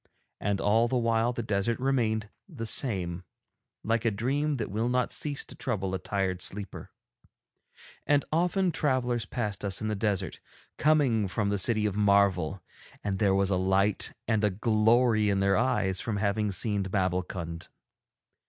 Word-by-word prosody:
And 100 -1 -1
all 110 +3 +3
the 125 - 0
while 115 0 +1
the 120 -1 -4
desert 110 +2 -1
remained 115 -5 0 0.2
the 130 -10 -6
same, 95 -8 0 0.6
like 115 +1 0
a 115 - +3
dream 135 +8 -1
that 110 -7 -4
will 110 +4 0
not 125 0 0
cease 145 -2 -2
to - - -9
trouble 95 -7 -3
a 95 - -1
tired 95 -1 -2
sleeper. 100 -1 -4 1.2
And 145 -1 +3
often 180 +2 +2
travellers 125 -6 0
passed 105 -6 -3
us 100 -1 0
in 110 - -2
the 105 - -1
desert, 105 -2 -2 0.4
coming 140 -9 +3
from 100 +2 -1
the 100 -1 0
City 110 +2 +1
of 105 -2 -1
Marvel, 100 -4 +2 0.4
and 100 -2 -2
there 100 -2 +3
was 100 0 +2
a 95 - +2
light 95 +2 +1 0.2
and 110 -2 +1
a 105 - +4
glory 110 +2 +3
in 100 -1 +1
their 100 0 +3
eyes 105 -6 +1
from 110 -3 -2
having 105 0 0
seen 100 +2 +1
Babbulkund. 90 -3 -2
105 Hz, 160 wpm, -28 LUFS, 95-120 Hz, 1.2 s, a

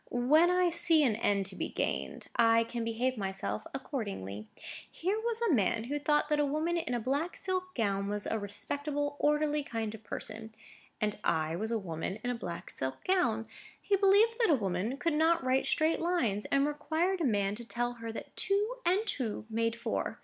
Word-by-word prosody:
When 295 +8 +4
I 360 -1 +3
see 335 -2 +4
an 235 -6 +3
end 205 -3 +1
to 190 0 -6
be - - -3
gained, - - -2
I 230 0 +5
can 230 0 -4
behave 235 +3 -1
myself 190 - -3
accordingly. 195 - -5 0.4
Here 385 +6 -1
was 465 0 -1
a 435 -8 +3
man 220 -1 +2
who 285 +5 -2
thought 295 +1 +2
that 300 -1 +2
a - - +4
woman 310 +4 0
in 290 -7 -1
a - - 0
black 280 +9 -1
silk 370 -1 -3
gown 200 -4 0
was 205 0 -3
a 220 - -1
respectable, 285 +8 -2
orderly 300 0 +2
kind 225 -5 -3
of 220 0 -10
person; 220 +1 -7 0.4
and 210 -1 -1
I 160 0 +1
was 215 +5 -3
a 230 - +1
woman 180 -1 -4
in 245 - 0
a - - -2
black 175 -7 -6
silk 130 0 -4
gown. 235 -13 +2 0.3
He 405 - +1
believed 410 +4 +4
that 460 - +4
a 310 - +6
woman 200 +3 -1
could 335 +2 0
not 325 +1 +3
write 260 +1 +2
straight 315 +1 +2
lines, 260 - 0
and 275 0 +2
required 320 +5 0
a - - +1
man 205 -6 +1
to 235 +3 -7
tell 240 +1 -1
her 230 0 -4
that 225 - -8
two 415 +5 +2
and 380 +5 +2
two 235 - -2
made 230 +1 0
four. 230 - -3
250 Hz, 200 wpm, -31 LUFS, 215-325 Hz, 0.4 s, a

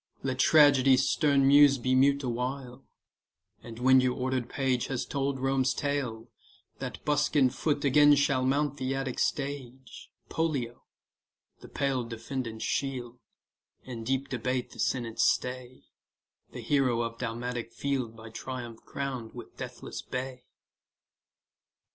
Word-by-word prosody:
Let 130 -1 -2
Tragedy's 135 -3 +5
stern 140 -2 +3
muse 140 0 +7
be 130 +1 0
mute 140 +2 +3
Awhile; 125 +1 -4 0.8
and 115 -1 -10
when 130 +1 +5
your 125 -1 0
order'd 130 -1 -2
page 130 -3 0
Has 130 -2 -3
told 140 -1 -2
Rome's 135 -1 +1
tale, 130 -6 -3 0.5
that - - -7
buskin'd 145 -3 +2
foot 145 -2 -1
Again 145 +2 +6
shall 140 -2 +2
mount 140 +2 0
the 130 0 -2
Attic 135 -2 -3
stage, 135 -3 -4 0.2
Pollio, 140 -8 -2 0.7
the - - -13
pale 135 -3 -1
defendant's 115 0 -5
shield, 125 -3 -3 0.6
In 120 -3 -7
deep 135 +3 -1
debate 125 0 -2
the - - -14
senate's 120 -3 0
stay, 125 0 -5 0.7
The - - -7
hero 130 -5 +1
of 115 0 -5
Dalmatic 120 0 -4
field 130 -5 -3
By 110 0 -11
Triumph 120 -1 -7
crown'd 130 -5 -5
with - - -10
deathless - - -7
bay. 125 0 -6
130 Hz, 130 wpm, -29 LUFS, 120-140 Hz, 0.8 s, muse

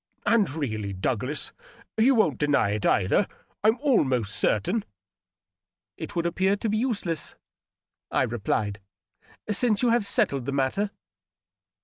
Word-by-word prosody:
And 225 -4 +3
really, 110 -9 -3
Douglas, 125 +9 -2 0.4
you 250 +4 +4
won't 160 - +2
deny 145 -8 +2
it, 105 -1 0
either, 100 - +2 0.4
I'm 220 +3 +4
almost 130 - +2
certain," 185 - +1 0.6
" 95 0 -67
It - - -7
would 170 -1 0
appear 190 +3 +1
to 215 +2 -3
be 215 - +1
useless," 205 - -2 0.7
I - - +2
replied, 105 -2 -2 0.4
" - - -52 0.3
since 215 +1 +2
you 245 - +4
have 235 -1 +3
settled 135 -9 +1
the 140 - -2
matter." 140 +10 0
150 Hz, 135 wpm, -26 LUFS, -, 0.7 s, you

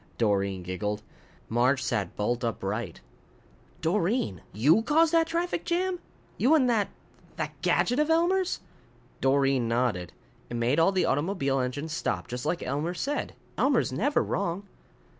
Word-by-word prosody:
Doreen 100 -4 +1
giggled. 105 +4 -3 0.4
Marge 125 +3 +2
sat 105 - -1
bolt 120 +4 -1
upright. 105 -3 -3 0.8
"Doreen! 170 - 0
You 145 - +4
caused 315 +6 +3
that 330 -1 +4
traffic 340 +1 -1
jam? 360 +1 0 0.4
You 285 +6 +5
and 270 -5 +4
that 210 -4 +1 0.5
that - - -5
gadget 245 +3 +2
of 300 +1 +2
Elmer's?" 355 +3 +2 0.6
Doreen 135 -2 +3
nodded. 115 - 0 0.4
"It 120 - -5
made 120 +6 +2
all 165 +4 +5
the 190 -2 +1
automobile 145 -3 0
engines 145 +5 -3
stop, 90 - -2
just 125 0 -4
like 175 - -1
Elmer 150 +7 -2
said. 285 +11 -2 0.2
Elmer's 270 - +2
never 270 - +2
wrong." 180 +1 -2
145 Hz, 140 wpm, -28 LUFS, -, 0.8 s, You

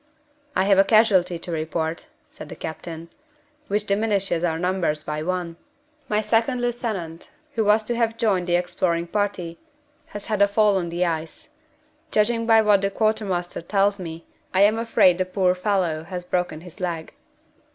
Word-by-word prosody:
"I 185 - +3
have 195 0 +4
a - - +8
casualty 195 -5 +4
to 170 +1 -7
report," 160 0 -3 0.2
said - - -11
the - - -7
captain, 165 +1 -7 0.6
"which 210 +1 -1
diminishes 200 -4 0
our 165 -2 0
numbers 175 -4 -1
by 150 0 -3
one. 175 0 -3 0.5
My 210 +1 +1
second 225 +4 +1
lieutenant, 220 -9 -4 0.2
who 225 - +1
was 210 +1 +4
to 240 +2 -2
have 230 -1 0
joined 200 -6 +1
the 175 - +2
exploring 175 -1 0
party, 180 -3 -2 0.5
has 205 -1 -8
had 215 -3 -1
a 200 - +7
fall 205 -1 +3
on 175 -2 -2
the 175 +2 0
ice. 160 -1 -4 0.6
Judging 230 +2 +1
by 225 -1 +6
what 205 -2 +4
the 195 - +1
quartermaster 195 -5 -1
tells 200 +3 +1
me, 165 -2 -7 0.3
I 190 - +4
am 215 +2 +4
afraid 190 -6 +3
the 185 - +1
poor 185 0 +1
fellow 180 -4 0
has 180 0 -6
broken 180 -3 -2
his 180 +2 -13
leg." 170 -3 -4
185 Hz, 170 wpm, -23 LUFS, 170-210 Hz, 0.6 s, a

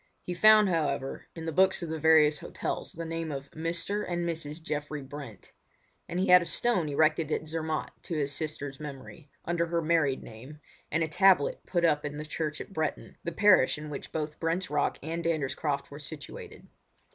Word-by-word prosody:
He 180 - -4
found, 215 +3 +7
however, 145 -6 -1
in 165 -1 -6
the 165 - -2
books 190 +2 +3
of 170 - -4
the 160 0 -3
various 155 -1 +5
hotels - - -4
the 165 0 -5
name 165 -1 -3
of 140 0 -6
"Mr. 170 +6 -2
and 175 -1 -1
Mrs. 160 -2 -4
Geoffrey 150 -2 -4
Brent". 135 -6 -10 0.6
And 175 - -2
he 190 - +1
had 180 0 +9
a - - -3
stone 200 -11 +1
erected 155 +1 +2
at 155 - -1
Zermatt 160 0 -3
to 165 - -4
his 145 -1 0
sister's 145 -2 -4
memory, 145 0 -9 0.2
under 170 0 0
her 170 0 0
married 155 -5 +2
name, 130 +7 -11 0.3
and 160 +2 +2
a - - 0
tablet 180 -2 +4
put 175 -2 +1
up 150 -3 +2
in 145 0 -4
the 150 - -5
church 155 0 -3
at 195 - -8
Bretten, 160 -4 -3
the 170 - -2
parish 185 -7 +5
in 150 0 -7
which 140 - -7
both 150 -1 -4
Brent's 170 +2 -1
Rock 145 -1 +1
and 165 +2 -3
Dander's 155 -5 0
Croft 145 -3 -2
were 145 - -8
situated. 145 0 -9
160 Hz, 195 wpm, -29 LUFS, 145-170 Hz, 0.6 s, had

